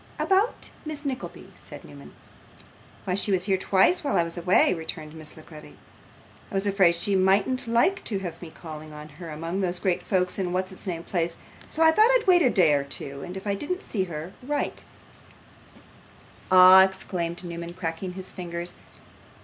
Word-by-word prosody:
'About 395 +5 0
Miss 305 -1 -7
Nickleby 265 -2 -6
' - - -25
said - - -11
Newman. - - -13 0.9
'Why, 185 - -1
she 200 +2 +1
was 185 -2 +2
here 195 0 +1
twice 200 - +3
while 280 - 0
I 170 - +4
was 170 0 -5
away,' 180 +1 +3
returned 160 -2 -7
Miss 155 -1 -8
La 155 - -12
Creevy. 155 -2 -13 0.7
'I - - -14
was 195 +1 +1
afraid 195 -4 +3
she 195 +3 +1
mightn't 195 +7 +2
like 240 +12 +2
to 205 - 0
have 175 -4 -6
me 170 - -8
calling 155 -1 -10
on 150 0 -10
her 160 +3 -10
among 165 +4 -4
those 180 -2 -1
great 180 0 -1
folks 180 0 -1
in 180 -2 -2
what's 185 +1 -2
its 190 - -7
name 170 -2 -4
Place, 170 -2 -2 0.3
so 320 - 0
I 320 - +7
thought 430 +8 +5
I'd - - -7
wait 360 -2 +5
a 260 - +4
day 170 -9 +4
or 140 -1 +1
two, 140 0 -3
and 180 +4 -7
if 190 - -9
I 200 - 0
didn't 360 - -4
see 190 -4 -1
her, 165 +1 -7
write.' 290 +3 -3 1.6
'Ah!' 185 0 +9
exclaimed 175 -2 -3
Newman, 170 0 -7
cracking 180 +1 -4
his 190 0 -8
fingers. 175 -1 -5
185 Hz, 190 wpm, -25 LUFS, 170-200 Hz, 1.6 s, Ah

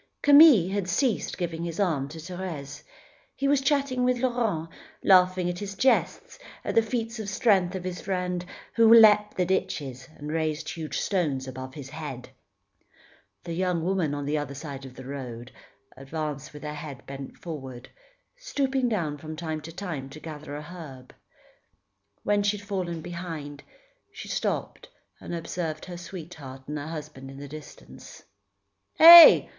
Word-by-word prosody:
Camille 285 - +7
had 200 -3 -2
ceased 235 +4 0
giving 170 -2 -3
his 170 +1 -5
arm 160 -9 0
to 160 - -10
Thérèse. 160 -4 -7 0.5
He 275 - -1
was 280 -1 +3
chatting 275 -2 +1
with 250 0 +2
Laurent, 235 -10 -1 0.4
laughing 185 -1 +4
at 175 0 -3
the 200 +1 -6
jests, 260 +5 +1 0.3
at - - -2
the 230 - +5
feats 225 0 -3
of 210 -2 -4
strength 190 -4 +2
of 185 - -5
his 180 -1 -5
friend, 180 -2 -2 0.3
who 230 -1 +5
leapt 210 -2 +7
the 180 - +2
ditches 135 -8 -2
and 150 +1 -6
raised 155 -1 -2
huge 160 -2 -5
stones 150 -9 -1
above 130 0 -8
his 140 -3 -9
head. 145 -5 -7 1.1
The 170 - -5
young 180 -1 -1
woman, 175 -5 0
on 145 -1 -4
the 150 +1 0
other 140 -1 -6
side 140 -2 -7
of 130 -1 -11
the 130 - -10
road, 125 -3 -7 0.4
advanced 145 +1 -5
with 150 0 -11
her 150 0 -4
head 150 -3 -8
bent 135 0 -8
forward, 135 -7 -8 0.5
stooping 270 - -1
down 160 -9 -2
from 155 +1 -7
time 160 -1 -4
to 165 - -9
time 165 -7 -6
to 145 +3 -11
gather 150 -2 -8
an 150 - -6
herb. 150 -6 -11 1.1
When 205 0 +2
she 205 +1 +1
had 205 - -12
fallen 180 -5 -3
behind, 160 -4 -7 0.5
she - - -9
stopped - - -3 0.3
and 175 - -6
observed 165 -2 -4
her 175 -1 -8
sweetheart 160 -7 -9
and 150 +1 -4
husband 145 -3 -7
in 135 - -11
the 140 +1 -8
distance. 150 +1 -12 0.7
"Heh! 335 +1 +11
165 Hz, 160 wpm, -26 LUFS, 145-195 Hz, 1.1 s, Heh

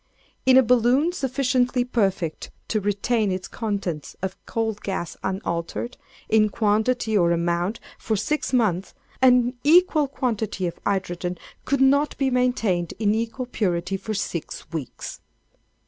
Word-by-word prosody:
In 260 0 +7
a 265 - +7
balloon 250 +7 +3
sufficiently 255 -4 +1
perfect 195 -9 -1 0.2
to 215 - 0
retain 205 +1 +1
its 185 0 -3
contents 200 -9 -4
of 190 0 -2
coal 225 -1 -1
gas 195 -5 -4
unaltered, 190 +4 -3 0.3
in 215 -1 +4
quantity 220 +2 +1
or 170 -4 +4
amount, 170 +5 0 0.2
for 220 - -1
six 300 +9 -1
months, 205 -8 +1 0.3
an 250 -1 +5
equal 310 -1 +5
quantity 220 -8 -2
of 170 - -4
hydrogen 180 -2 -2 0.3
could 275 -1 +1
not 280 +2 +3
be 270 -1 +1
maintained 225 -9 +1
in 210 -1 +2
equal 230 +3 -2
purity 190 -6 -1
for 215 +3 -4
six 175 -4 -4
weeks. 155 -6 -6
220 Hz, 130 wpm, -24 LUFS, 190-250 Hz, 0.3 s, In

